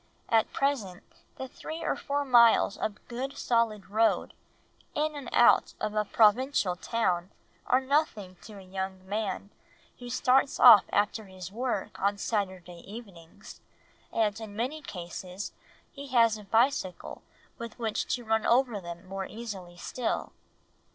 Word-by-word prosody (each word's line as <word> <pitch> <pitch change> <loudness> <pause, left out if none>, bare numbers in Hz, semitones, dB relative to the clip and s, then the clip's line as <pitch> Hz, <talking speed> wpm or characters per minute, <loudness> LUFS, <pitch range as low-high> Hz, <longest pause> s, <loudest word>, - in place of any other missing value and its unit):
At 225 -2 +3
present 240 -11 -1 0.3
the 265 - -6
three 315 +5 -7
or - - 0
four 285 0 -2
miles 235 -5 +5
of 210 -1 -5
good 260 +3 -5
solid 230 -4 0
road 225 +2 +2 0.6
in 300 0 0
and 280 -4 -7
out 240 - +4
of 215 0 -2
a 215 0 0
provincial 215 -2 +3
town 185 -3 -1 0.4
are 255 - +4
nothing 260 -9 -1
to 215 -2 -11
a 195 - -11
young 190 0 -6
man 205 -1 -3 0.5
who 245 -1 -8
starts 255 +2 +2
off 205 - +9
after 210 +1 0
his 185 -2 -9
work 235 -2 -3
on 200 +1 +1
Saturday 185 -5 -3
evenings, 200 -4 -12 0.5
and 220 -1 0
in 210 -2 -8
many 260 +8 -3
cases 180 -2 -7 0.4
he 280 -1 -9
has 230 -4 +4
a 210 -1 -10
bicycle 225 -4 0 0.4
with 235 -1 -7
which 225 -3 -2
to 245 -2 -9
run 220 0 +1
over 240 -4 +2
them 170 +1 -9
more 195 0 -5
easily 195 -6 -8
still. 240 +6 -3
215 Hz, 145 wpm, -29 LUFS, 190-245 Hz, 0.6 s, off